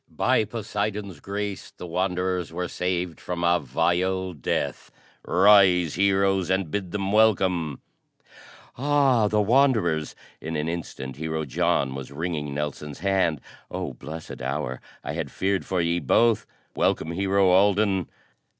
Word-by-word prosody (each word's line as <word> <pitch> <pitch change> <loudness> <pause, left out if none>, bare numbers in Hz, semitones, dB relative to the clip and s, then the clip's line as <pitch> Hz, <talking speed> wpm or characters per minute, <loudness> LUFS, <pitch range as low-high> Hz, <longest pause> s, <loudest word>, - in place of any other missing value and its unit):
"By 110 - +2
Poseidon's 105 -4 -4
grace 100 +2 -4
the - - -10
Wanderers 90 -1 -1
were 90 +1 -3
saved 90 -2 -2
from 90 -1 -4
a 85 0 +4
vile 90 +6 0
death. 70 -6 -3 0.3
Rise 95 -4 +5
Heroes, 95 -1 +2
and 95 -4 0
bid 100 -3 -2
them 100 +1 -2
welcome!" 95 -8 +2 1.0
"Ah, 135 -5 +3
the 105 +1 +1
Wanderers!" 105 - +2 0.3
In 80 +1 -4
an 75 +1 -1
instant 75 -6 -5
Hero 80 0 -3
John 65 0 0
was 65 0 -7
wringing 75 -1 -3
Nelson's 75 0 -5
hand. 95 -7 +1 0.3
"Oh - - -4
blessed 80 +1 -8
hour! 65 -1 -3 0.2
I - - -4
had - - -3
feared 95 -4 -1
for 95 -2 0
ye 85 +1 +1
both. 115 - +2 0.3
Welcome, 80 - +1
Hero 95 +2 +2
Alden!" 100 -1 +3
90 Hz, 130 wpm, -25 LUFS, 80-100 Hz, 1.0 s, Rise